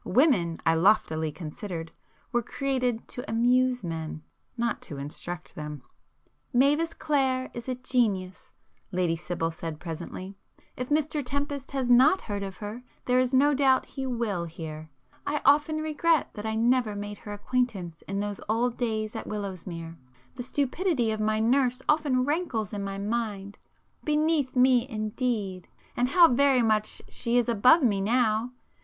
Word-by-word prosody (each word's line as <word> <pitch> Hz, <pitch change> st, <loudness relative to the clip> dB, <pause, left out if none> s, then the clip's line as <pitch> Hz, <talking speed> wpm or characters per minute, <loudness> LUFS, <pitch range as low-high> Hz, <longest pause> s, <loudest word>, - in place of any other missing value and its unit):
Women, 185 Hz, -, +3 dB
I 165 Hz, -, +5 dB
loftily 160 Hz, -3 st, +3 dB
considered, 165 Hz, +1 st, -6 dB, 0.4 s
were 240 Hz, -, +2 dB
created 250 Hz, -2 st, -1 dB
to 245 Hz, -, -6 dB
amuse 250 Hz, +1 st, +2 dB
men,—not 165 Hz, +8 st, -5 dB
to 145 Hz, -, -8 dB
instruct 165 Hz, +5 st, -6 dB
them. 150 Hz, -3 st, -7 dB, 0.7 s
"Mavis 295 Hz, +6 st, +3 dB
Clare 265 Hz, -4 st, 0 dB
is 240 Hz, +1 st, -6 dB
a 255 Hz, -, -1 dB
genius,"—Lady 190 Hz, -6 st, -2 dB
Sibyl 165 Hz, 0 st, -3 dB
said 160 Hz, -1 st, -6 dB
presently—"If 185 Hz, +8 st, -8 dB
Mr 300 Hz, 0 st, +1 dB
Tempest 285 Hz, +1 st, -3 dB
has 265 Hz, -2 st, 0 dB
not 260 Hz, +9 st, +6 dB
heard 205 Hz, -2 st, -4 dB
of 195 Hz, -1 st, -6 dB
her, 210 Hz, +3 st, -6 dB, 0.2 s
there 250 Hz, 0 st, +3 dB
is 255 Hz, -1 st, +2 dB
no 280 Hz, +3 st, +4 dB
doubt 265 Hz, -2 st, +3 dB
he 270 Hz, -1 st, -5 dB
will 225 Hz, -8 st, -1 dB
hear. 155 Hz, -1 st, -8 dB, 0.4 s
I 300 Hz, +1 st, 0 dB
often 295 Hz, +2 st, +4 dB
regret 310 Hz, +1 st, +1 dB
that 210 Hz, +1 st, -5 dB
I 220 Hz, -, -1 dB
never 235 Hz, -1 st, +2 dB
made 205 Hz, 0 st, -6 dB
her 205 Hz, -, -7 dB
acquaintance 205 Hz, -6 st, -2 dB
in 195 Hz, +1 st, -2 dB
those 205 Hz, -1 st, -3 dB
old 235 Hz, +2 st, +1 dB
days 220 Hz, -2 st, -2 dB
at -, -, -5 dB
Willowsmere,—the 165 Hz, -, -7 dB
stupidity 275 Hz, -, 0 dB
of 215 Hz, -, -2 dB
my 215 Hz, 0 st, +1 dB
nurse 250 Hz, +2 st, +2 dB
often 290 Hz, -5 st, +2 dB
rankles 275 Hz, -, -1 dB
in 200 Hz, -1 st, -3 dB
my 195 Hz, 0 st, -4 dB
mind. 205 Hz, -1 st, -3 dB, 0.4 s
'Beneath 300 Hz, -3 st, +1 dB
me'—indeed!—and 240 Hz, -3 st, 0 dB
how 340 Hz, +3 st, +7 dB
very 265 Hz, -1 st, +4 dB
much 215 Hz, -1 st, +1 dB
she 235 Hz, 0 st, -1 dB
is 245 Hz, -, +2 dB
above 250 Hz, +8 st, +5 dB
me 205 Hz, -5 st, +2 dB
now! 225 Hz, +1 st, +1 dB
235 Hz, 140 wpm, -27 LUFS, 195-260 Hz, 0.7 s, how